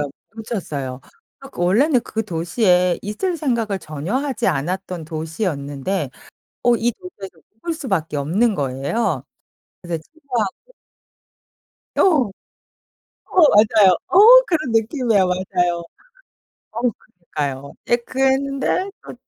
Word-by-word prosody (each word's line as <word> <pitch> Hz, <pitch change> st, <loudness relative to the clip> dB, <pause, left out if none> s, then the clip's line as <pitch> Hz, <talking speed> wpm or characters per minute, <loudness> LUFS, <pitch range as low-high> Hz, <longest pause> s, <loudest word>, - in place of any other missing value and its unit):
맞아요. 145 Hz, -1 st, -2 dB, 0.2 s
놓쳤어요. 150 Hz, -, -5 dB, 0.5 s
그 175 Hz, -, -4 dB
원래는 245 Hz, -, +3 dB
그 225 Hz, -2 st, -4 dB
도시에 180 Hz, 0 st, +2 dB
있을 340 Hz, -, -2 dB
생각을 235 Hz, -9 st, -1 dB
전혀 155 Hz, -, -5 dB
하지 270 Hz, -4 st, -1 dB
않았던 180 Hz, +2 st, -2 dB
도시였는데 155 Hz, -, -3 dB, 0.5 s
어 240 Hz, -1 st, +5 dB
이 235 Hz, +1 st, 0 dB
도시에서 205 Hz, -, -11 dB, 0.2 s
묵을 330 Hz, +10 st, -4 dB
수밖에 190 Hz, -, -2 dB
없는 190 Hz, +11 st, +1 dB
거예요. 140 Hz, -, -1 dB, 0.6 s
그래서 170 Hz, -2 st, -4 dB
친구하고 280 Hz, -, -4 dB, 1.2 s
어. -, -, +4 dB
어 275 Hz, -, +1 dB, 1.0 s
맞아요. 210 Hz, -2 st, +6 dB, 0.2 s
어 365 Hz, -, +4 dB, 0.3 s
그런 310 Hz, -8 st, -1 dB
느낌이에요. 225 Hz, -, +2 dB
맞아요. 180 Hz, -2 st, 0 dB, 0.9 s
어 225 Hz, -, -5 dB, 0.5 s
그러니까요. 140 Hz, -2 st, -3 dB
예 240 Hz, -, +5 dB
그랬는데 270 Hz, +8 st, 0 dB
또 -, -, -9 dB
200 Hz, 260 characters per minute, -20 LUFS, 165-245 Hz, 1.2 s, 맞아요